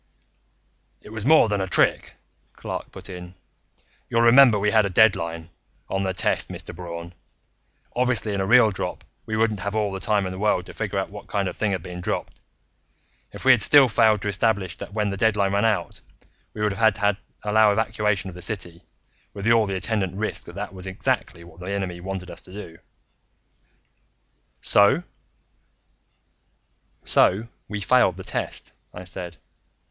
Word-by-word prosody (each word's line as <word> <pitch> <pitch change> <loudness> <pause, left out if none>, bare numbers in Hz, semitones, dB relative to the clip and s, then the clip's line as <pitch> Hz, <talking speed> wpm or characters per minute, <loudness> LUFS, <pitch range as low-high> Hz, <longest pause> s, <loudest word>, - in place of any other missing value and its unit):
"It - - -13
was 110 +2 -3
more 155 -6 +6
than 100 -2 -1
a 95 - -2
trick," - - +1 0.4
Clark - - -6
put - - -10
in. 90 0 -9 0.7
"You'll 115 0 +2
remember 120 -1 +7
we 105 +1 +1
had 110 0 +4
a - - -5
deadline 85 -5 +2 0.4
on 95 - -1
the 95 -1 -1
test, 90 - -1
Mr. - - -8
Braun. 85 -1 -8 0.8
Obviously, 125 -4 0
in 100 - -1
a - - 0
real 115 -1 +6
drop 95 - -5 0.2
we 110 - -2
wouldn't 110 -2 +1
have 100 +3 -4
all 105 -2 0
the 95 - -5
time 105 -1 0
in 95 - -4
the 95 - -7
world 100 -4 +1
to - - -11
figure 105 -2 -3
out 95 - -2
what 105 0 -10
kind 100 -2 -1
of - - -4
a - - -27
thing 110 - +1
had 90 -4 -3
been 90 0 -7
dropped. - - -4 0.9
If - - -10
we 130 - +8
had 125 -4 +5
still 140 +4 +7
failed 110 -1 +3
to - - -2
establish 100 -2 0
that - - -8
when 105 -1 -1
the 100 - -4
deadline 100 -2 +2
ran 100 +2 +2
out, 100 -6 -1 0.5
we 105 - -3
would 105 -1 +1
have 110 +1 +3
had 105 -1 +1 0.3
to 105 - -2
allow 110 0 +5
evacuation 105 -2 0
of 95 - -7
the 90 - -10
city, 90 -5 -5 0.5
with 100 0 -6
all 115 -2 +4
the 95 - -3
attendant 95 -2 -1
risk 110 +2 -4
that 85 - -10
that 100 -1 -5
was 95 0 -8
exactly 95 -2 -2
what 85 0 -16
the 90 +2 -6
enemy 95 -3 -3
wanted 95 -1 -6
us - - -10
to 90 - -14
do." 90 -5 -10 1.8
"So?" 100 +12 +4 2.0
"So 105 +5 +3 0.2
we 105 -1 -5
failed 100 -4 +3
the 95 - -8
test," - - -4 0.2
I 90 - -7
said. 90 -2 -6
100 Hz, 185 wpm, -24 LUFS, 95-110 Hz, 2.0 s, we